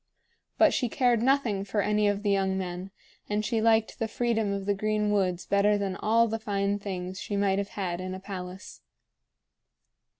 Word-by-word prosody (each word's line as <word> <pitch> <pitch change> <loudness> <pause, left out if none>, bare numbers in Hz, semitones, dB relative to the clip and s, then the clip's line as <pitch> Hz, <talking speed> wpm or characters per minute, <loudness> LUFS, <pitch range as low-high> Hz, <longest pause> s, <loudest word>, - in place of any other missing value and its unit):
But - - +5
she 245 - 0
cared 240 -1 +2
nothing 245 -6 +2
for 205 +1 -1
any 210 0 +2
of 205 0 0
the 205 - +2
young 190 -1 +1
men, 180 0 -4 0.4
and 210 +1 0
she 225 0 0
liked 225 -1 +2
the 225 - 0
freedom 225 -3 0
of 200 -1 -3
the 205 - +2
green 210 +1 0
woods 185 -3 0
better 205 +1 +3
than 195 -2 -2
all 230 +3 +3
the 225 0 -3
fine 200 -2 -1
things 185 -2 -5
she 205 - -4
might 200 -1 +2
have 200 0 -3
had 180 -3 -2
in 185 0 -4
a - - -7
palace. 190 -1 -8
205 Hz, 190 wpm, -28 LUFS, 190-215 Hz, 0.4 s, But